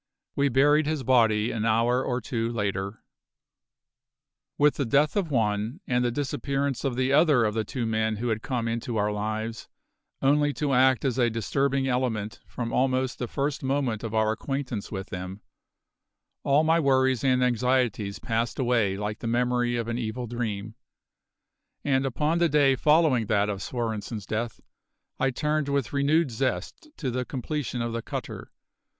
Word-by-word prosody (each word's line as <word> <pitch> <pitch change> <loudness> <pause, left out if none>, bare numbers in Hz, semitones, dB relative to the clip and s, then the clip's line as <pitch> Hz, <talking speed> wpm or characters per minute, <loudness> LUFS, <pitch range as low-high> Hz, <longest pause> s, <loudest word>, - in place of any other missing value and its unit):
We 140 0 +2
buried 145 +4 +4
his 155 -3 -1
body 115 -3 +3
an 110 -2 -2
hour 115 +3 +2
or 125 -1 -1
two 115 0 -2
later. 100 -2 -3 1.5
With 145 0 +3
the 140 - +1
death 145 +5 +3
of 195 -5 0
one, 110 - 0
and 125 0 +1
the 120 - +2
disappearance 140 +1 -2
of 135 -3 -1
the 130 +2 +1
other 150 -5 +5
of 105 - 0
the 110 0 0
two 120 +3 -3
men 110 0 0
who 120 +3 -2
had 110 -1 -1
come 125 -4 -2
into 115 +1 -2
our 105 0 +1
lives, 110 +2 -4 0.5
only 145 +1 +3
to 145 -2 -1
act 130 -1 +4
as 130 -1 0
a 120 -1 +4
disturbing 135 +4 0
element 120 -5 -1
from 115 -2 -5
almost 130 0 +1
the 125 - -2
first 140 +3 -2
moment 130 -5 -1
of 115 -1 -4
our 110 0 +3
acquaintance 125 -2 -4
with 95 -1 -5
them, 95 +2 -6 1.0
all 140 +3 +3
my 165 +1 +3
worries 130 -4 +2
and 130 -1 +3
anxieties 125 -4 +1
passed 115 0 -2
away 115 -7 +1
like 105 +1 -4
the 115 - -5
memory 120 +1 +1
of 115 -1 -2
an 115 +1 -2
evil 120 +1 -3
dream; 110 -3 -4 1.1
and 135 -1 +1
upon 150 +6 0
the 170 -1 +3
day 140 -2 +4
following 150 -6 +3
that 105 -1 +2
of 100 -1 -3
Svorenssen's 110 -3 -4
death 115 +2 -3 0.6
I 135 - +2
turned 150 +2 -1
with 140 -3 -1
renewed 145 +1 +2
zest 130 - -3
to 130 -4 -2
the 125 +1 -1
completion 130 -1 -3
of 115 -1 -3
the 115 - -2
cutter. - - -6
125 Hz, 170 wpm, -26 LUFS, 110-135 Hz, 1.5 s, other